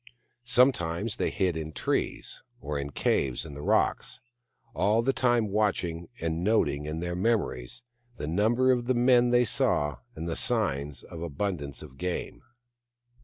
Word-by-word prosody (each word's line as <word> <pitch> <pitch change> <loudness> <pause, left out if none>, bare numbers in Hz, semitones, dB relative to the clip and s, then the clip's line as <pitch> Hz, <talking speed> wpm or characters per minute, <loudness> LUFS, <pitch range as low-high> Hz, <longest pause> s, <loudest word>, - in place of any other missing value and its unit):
Sometimes 115 -6 +2
they - - 0
hid 90 -3 0
in 80 -1 -5
trees, - - -2 0.2
or 70 +1 -3
in 70 0 -4
caves 65 -1 0
in 75 - -8
the 70 - -8
rocks, - - +1 0.5
all 105 +4 +2
the 135 +2 +2
time 120 -5 +2
watching, 90 -5 0
and 80 +1 -2
noting 85 -9 +1
in 80 +2 -3
their 85 0 -3
memories 90 - -1 0.3
the - - -4
number 110 +10 +3
of 120 -2 +1
the 130 +1 +1
men 120 0 +5
they 120 0 +4
saw 75 - +1 0.2
and 80 +2 -5
the 80 - -2
signs 75 - -1
of 85 - -9
abun 85 +4 -2
dance 70 -4 -7
of 65 - -13
game. 90 -1 -3
90 Hz, 160 wpm, -28 LUFS, 75-115 Hz, 0.5 s, men